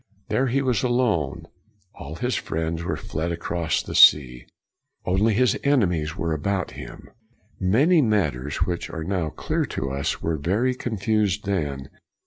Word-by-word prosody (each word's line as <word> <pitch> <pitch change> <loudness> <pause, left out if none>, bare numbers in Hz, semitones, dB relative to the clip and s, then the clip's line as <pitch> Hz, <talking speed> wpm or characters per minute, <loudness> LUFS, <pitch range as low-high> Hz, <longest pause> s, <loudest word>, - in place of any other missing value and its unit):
There 135 - +1
he 135 +3 0
was 125 -5 +1
alone; 120 - 0 0.5
all 70 +3 -8
his 125 +8 -2
friends 80 +1 -2
were - - -2
fled 80 +2 -4
across 85 -1 -2
the - - -7
sea; 60 -4 +5 0.6
only 100 +4 +2
his 125 -1 +2
enemies 90 - +1
were 80 0 -1
about 95 +4 -2
him. - - -10 0.5
Many 140 - +4
matters 90 - 0
which 90 -1 -3
are 80 - -5
now 90 -2 -1
clear - - -2
to 65 0 -4
us 70 +1 -2
were 80 -1 -1
very 105 - 0
confused 105 -4 -1
then. 75 -9 -2
90 Hz, 145 wpm, -24 LUFS, 80-115 Hz, 0.6 s, sea